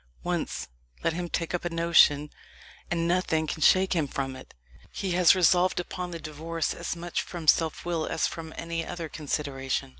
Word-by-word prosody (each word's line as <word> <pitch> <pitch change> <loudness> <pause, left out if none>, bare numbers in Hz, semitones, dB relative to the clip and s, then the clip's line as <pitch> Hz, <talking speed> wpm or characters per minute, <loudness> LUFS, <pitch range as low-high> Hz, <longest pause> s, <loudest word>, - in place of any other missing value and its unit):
Once - - -2 0.4
let - - +1
him 175 +1 -4
take 165 0 -2
up 175 - -1
a 175 - -1
notion, 165 -3 +4 0.6
and 170 -1 0
nothing 170 -3 +1
can 155 - -4
shake 190 +4 +5
him 160 -5 +1
from 135 -1 -3
it. - - -13 0.4
He 195 -2 -3
has 180 +1 +6
resolved 180 0 +4
upon 180 0 -4
the 170 - -5
divorce 160 +2 -3
as - - -4
much 170 +1 -3
from 170 -3 -7
self 160 +1 +3
will 170 -2 -1
as 160 - 0
from 160 -1 -5
any 165 0 -3
other 170 -1 -5
consideration. 135 -3 -3
165 Hz, 180 wpm, -27 LUFS, 155-175 Hz, 0.6 s, has